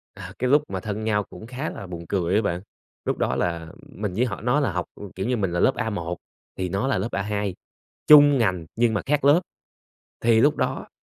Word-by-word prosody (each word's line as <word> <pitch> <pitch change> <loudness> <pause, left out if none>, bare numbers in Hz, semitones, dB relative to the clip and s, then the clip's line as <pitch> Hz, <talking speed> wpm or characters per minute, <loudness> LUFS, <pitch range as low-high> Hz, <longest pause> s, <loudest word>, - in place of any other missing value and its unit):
À, 95 -1 -9
cái 125 - 0
lúc 145 +2 +5
mà 95 - -3
thân 105 +2 -4
nhau 105 -1 +1
cũng 110 - -11
khá 130 +5 -4
là 100 - -8
buồn 85 -1 -7
cười 95 -1 0
á 110 - +4
bạn. 90 -4 -2 0.4
Lúc - - -1
đó - - 0
là 85 -2 -2 0.3
mình 105 -2 -3
với 115 +7 +1
họ 100 -6 -5
nó 125 +6 +2
là 140 -8 0
học, 90 0 -2 0.3
kiểu, 95 - -3
như 125 0 +1
mình 95 -5 -1
là 85 - -1
lớp 130 - +3
A1 90 -7 -3 0.4
thì 95 -1 -2
nó 100 +9 -1
là 135 -4 +1
lớp 105 +5 -2
A2, 100 -1 -2 0.5
chung 145 -2 +8
ngành 95 -8 0
nhưng 115 0 +2
mà 105 - 0
khác 145 0 +1
lớp. 145 +5 +6 0.8
Thì 115 -1 +5
lúc 145 +3 +4
đó - - -2
105 Hz, 230 wpm, -24 LUFS, 95-125 Hz, 0.8 s, chung